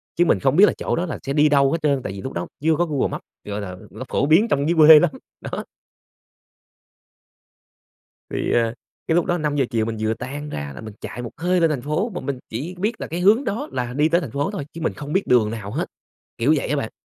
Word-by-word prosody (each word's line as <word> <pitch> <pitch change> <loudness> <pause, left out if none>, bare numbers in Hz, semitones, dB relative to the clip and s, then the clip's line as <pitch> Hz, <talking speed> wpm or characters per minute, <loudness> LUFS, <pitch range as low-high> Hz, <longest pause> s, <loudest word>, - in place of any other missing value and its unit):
chứ 175 - +3
mình - - +3
không 135 0 +2
biết 195 +5 +8
là - - +2
chỗ - - -1
đó 170 - -1
là 165 - -5
sẽ 140 - -2
đi 150 +1 +4
đâu 140 -1 +4
hết 165 - +1
trơn, 140 -3 +2
tại - - -4
vì 95 - -7
lúc 130 - -6
đó - - -3 0.2
chưa 160 0 +3
có 175 - +1
Google 150 -5 0
Map, - - -4 0.2
gọi 105 0 -4
là 90 -2 -6
nó 115 +4 -7
phổ - - +1
biến 165 +10 +5
trong 145 +2 +1
dưới 170 - +2
quê 155 0 +10
lắm, 175 -1 +2 0.3
đó. - - -5 2.7
Thì, - - -2
ờ, 115 -1 +2 0.3
cái 160 - +1
lúc 175 0 +3
đó 175 -1 0
5:00 145 -3 0
chiều 115 -2 +1
mình 115 -1 -3
vừa 110 +1 0
tan 145 +5 -6
ra 70 - -5
là - - -8
mình 110 -1 -9
chạy 120 - -6
một 120 - -6
hơi 180 +2 +1
lên 165 -1 +4
thành 140 -5 -2
phố, 155 - -1
mà - - -3
mình 135 -1 -3
chỉ 145 +11 -4
biết 210 +6 -2
là - - -3
cái 170 +2 -4
hướng 215 +9 +4
đó 220 -2 -3
là 125 -2 -3
đi 150 +3 +3
tới 170 +2 +3
thành 145 -9 -6
phố 145 - -1
thôi 200 -8 -4
chứ 165 - -8
mình 160 - 0
không 150 +1 -7
biết 190 - +1
đường 115 -4 +4
nào 110 -3 -6
hết, - - -1 0.5
kiểu 135 +7 +3
vậy - - -2
á 150 - +1
bạn. 125 -6 -3
145 Hz, 265 wpm, -22 LUFS, 120-170 Hz, 2.7 s, quê